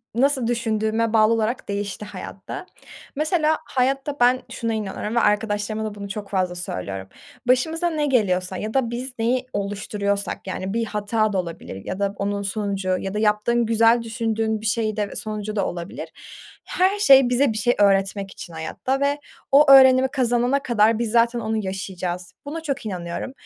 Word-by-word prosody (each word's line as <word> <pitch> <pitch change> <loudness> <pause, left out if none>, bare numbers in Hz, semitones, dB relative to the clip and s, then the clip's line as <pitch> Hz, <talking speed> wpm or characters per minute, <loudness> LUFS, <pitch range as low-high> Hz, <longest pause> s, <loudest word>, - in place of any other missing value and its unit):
nasıl 265 -1 +2
düşündüğüme 225 -1 0
bağlı 220 0 +5
olarak 225 +3 -1
değişti 200 +1 -3
hayatta. 195 - -8 0.5
Mesela, 310 +1 +1
hayatta 270 +2 0
ben 250 +1 +4
şuna 230 -1 -2
inanıyorum 215 +1 -4
ve - - +4
arkadaşlarıma 210 0 0
da 210 -1 -5
bunu 200 -1 -7
çok 200 0 -6
fazla 185 -2 0
söylüyorum. 95 - -5 0.4
Başımıza 320 +7 +2
ne 305 -3 -1
geliyorsa 185 -8 +1
ya 215 +1 -4
da 265 -4 +1
biz 250 +2 -5
neyi 250 +3 +1
oluşturuyorsak, 200 0 -2
yani, 190 +1 -4
bir 230 0 0
hata 210 0 0
da - - 0
olabilir 165 - -6
ya 190 - -4
da 200 0 0
onun 200 0 -2
sonucu 195 -2 -1
ya 195 +1 -4
da 210 - -1
yaptığın 220 +2 +2
güzel 230 +1 +4
düşündüğün 225 -1 -1
bir 220 - -8
şey 215 0 0
de 205 -1 -1
ve - - -10
sonucu 215 0 -4
da 200 - +1
olabilir. 180 - -6 0.6
Her 380 +3 +1
şey 270 -8 +7
bize 250 -1 +2
bir 215 - -4
şey 240 +4 +2
öğretmek 195 0 +2
için 170 - -10
hayatta 255 +11 -3
ve 285 +1 +1 0.3
o 280 0 +7
öğrenimi 260 -1 +8
kazanana 250 0 +1
kadar 225 -1 +3
biz 230 -2 -1
zaten 235 +1 +3
onu 220 0 -2
yaşayacağız. 185 -1 -4
Buna 320 +3 -5
çok 275 -6 -3
inanıyorum 180 +4 -4
220 Hz, 170 wpm, -23 LUFS, 200-250 Hz, 0.6 s, öğrenimi